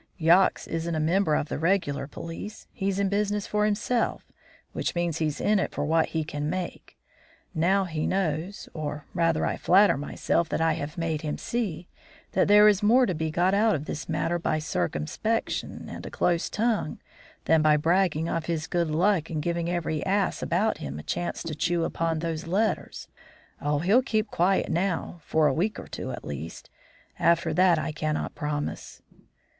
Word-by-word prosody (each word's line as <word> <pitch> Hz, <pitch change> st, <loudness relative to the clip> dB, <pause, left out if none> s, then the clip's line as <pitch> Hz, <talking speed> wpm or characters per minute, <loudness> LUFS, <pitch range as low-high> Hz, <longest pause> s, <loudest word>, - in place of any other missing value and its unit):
Yox 175 Hz, +2 st, +4 dB
isn't 165 Hz, 0 st, -3 dB
a -, -, 0 dB
member 160 Hz, 0 st, +2 dB
of 150 Hz, -, -1 dB
the -, -, -4 dB
regular 165 Hz, -5 st, 0 dB
police; 165 Hz, +8 st, -8 dB
he's 195 Hz, -1 st, -1 dB
in 200 Hz, 0 st, +2 dB
business 205 Hz, +1 st, 0 dB
for 210 Hz, 0 st, +1 dB
himself, 215 Hz, +3 st, 0 dB, 0.5 s
which -, -, -2 dB
means 175 Hz, -2 st, -1 dB
he's 155 Hz, -2 st, -1 dB
in 210 Hz, -1 st, +2 dB
it -, -, -1 dB
for 145 Hz, -, -2 dB
what 160 Hz, +1 st, +2 dB
he 160 Hz, -1 st, -2 dB
can 150 Hz, 0 st, -3 dB
make. 180 Hz, 0 st, -5 dB, 0.6 s
Now, 190 Hz, +5 st, +2 dB
he 160 Hz, -3 st, -2 dB
knows 185 Hz, 0 st, -2 dB
or, 150 Hz, -1 st, -5 dB
rather, 165 Hz, -2 st, +1 dB
I -, -, -1 dB
flatter 195 Hz, -4 st, +5 dB
myself 160 Hz, +3 st, -1 dB
that -, -, -1 dB
I 165 Hz, 0 st, +3 dB
have 150 Hz, 0 st, -5 dB
made 165 Hz, -2 st, -1 dB
him 150 Hz, -2 st, -3 dB
see 185 Hz, -8 st, -3 dB, 0.4 s
that 190 Hz, -, +2 dB
there 210 Hz, +1 st, +7 dB
is 205 Hz, -1 st, +4 dB
more 240 Hz, +5 st, +5 dB
to 185 Hz, -, -1 dB
be 160 Hz, 0 st, -2 dB
got 175 Hz, +4 st, +2 dB
out 215 Hz, +1 st, +3 dB
of 150 Hz, -, -4 dB
this 155 Hz, +1 st, -6 dB
matter 165 Hz, +2 st, 0 dB
by 160 Hz, -2 st, 0 dB
circumspection 150 Hz, -, -2 dB
and -, -, -8 dB
a -, -, -6 dB
close 170 Hz, -1 st, 0 dB
tongue 220 Hz, -7 st, 0 dB, 0.5 s
than 160 Hz, -1 st, +4 dB
by 155 Hz, -1 st, +5 dB
bragging 165 Hz, 0 st, +2 dB
of 165 Hz, -1 st, -2 dB
his 160 Hz, -2 st, -1 dB
good 170 Hz, -2 st, 0 dB
luck 170 Hz, +1 st, +2 dB
and 160 Hz, -, -2 dB
giving 170 Hz, 0 st, -1 dB
every 170 Hz, -3 st, -1 dB
ass 195 Hz, 0 st, 0 dB
about 200 Hz, +6 st, 0 dB
him 70 Hz, -1 st, -5 dB
a 75 Hz, -, -7 dB
chance 175 Hz, -, -3 dB
to 165 Hz, -2 st, -4 dB
chew 170 Hz, +2 st, 0 dB
upon 165 Hz, -1 st, -1 dB
those 165 Hz, 0 st, -3 dB
letters. 210 Hz, +6 st, -1 dB, 0.5 s
Oh, 145 Hz, 0 st, +1 dB
he'll 195 Hz, -, +4 dB
keep 220 Hz, -4 st, -1 dB
quiet 185 Hz, +3 st, +2 dB
now, 175 Hz, 0 st, -1 dB
for 160 Hz, 0 st, +2 dB
a 145 Hz, -, +3 dB
week 195 Hz, +9 st, 0 dB
or -, -, -7 dB
two -, -, -6 dB
at -, -, -7 dB
least. 75 Hz, +3 st, -7 dB, 0.5 s
After 170 Hz, -1 st, +3 dB
that 180 Hz, 0 st, +4 dB
I 155 Hz, -, -2 dB
cannot 155 Hz, 0 st, -2 dB
promise." 150 Hz, 0 st, -4 dB
170 Hz, 185 wpm, -26 LUFS, 155-195 Hz, 0.6 s, there